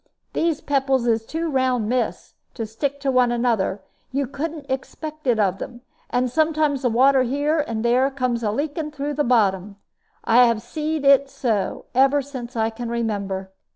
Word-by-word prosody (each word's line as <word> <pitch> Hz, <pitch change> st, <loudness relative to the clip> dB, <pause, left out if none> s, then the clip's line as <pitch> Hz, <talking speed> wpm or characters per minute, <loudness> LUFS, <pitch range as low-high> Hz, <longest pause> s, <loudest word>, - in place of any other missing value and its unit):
These 330 Hz, -2 st, 0 dB
pebbles 270 Hz, -3 st, +1 dB
is 225 Hz, -1 st, +1 dB
too 330 Hz, +1 st, -2 dB
round, 260 Hz, -6 st, +1 dB
miss, 250 Hz, +2 st, -2 dB, 0.2 s
to 230 Hz, -, -3 dB
stick 270 Hz, +6 st, -3 dB
to 275 Hz, -1 st, +1 dB
one 250 Hz, -2 st, +3 dB
another; 225 Hz, -5 st, 0 dB, 0.3 s
you 275 Hz, +1 st, 0 dB
couldn't 290 Hz, +3 st, -5 dB
expect 300 Hz, +3 st, -5 dB
it 240 Hz, -3 st, +3 dB
of 195 Hz, -2 st, +1 dB
them; 240 Hz, 0 st, -7 dB, 0.3 s
and 250 Hz, +1 st, +1 dB
sometimes 305 Hz, 0 st, +1 dB
the 250 Hz, -, +2 dB
water 260 Hz, +3 st, +4 dB
here 285 Hz, +5 st, 0 dB
and 230 Hz, -6 st, -2 dB
there 250 Hz, +3 st, +3 dB
comes 255 Hz, -3 st, -1 dB
a 215 Hz, -, 0 dB
leaking 295 Hz, +6 st, -2 dB
like 300 Hz, 0 st, -9 dB
through 290 Hz, +1 st, -3 dB
the 295 Hz, +1 st, 0 dB
bottom. 205 Hz, -5 st, +1 dB, 0.5 s
I 245 Hz, +2 st, +6 dB
have 230 Hz, -1 st, 0 dB
seed 305 Hz, +3 st, -3 dB
it 275 Hz, 0 st, +5 dB
so, 225 Hz, -7 st, -2 dB
ever 270 Hz, +2 st, +4 dB
since 255 Hz, -3 st, -8 dB
I 225 Hz, 0 st, +1 dB
can 235 Hz, +1 st, -6 dB
remember." 200 Hz, -5 st, -3 dB
255 Hz, 180 wpm, -22 LUFS, 230-285 Hz, 0.5 s, I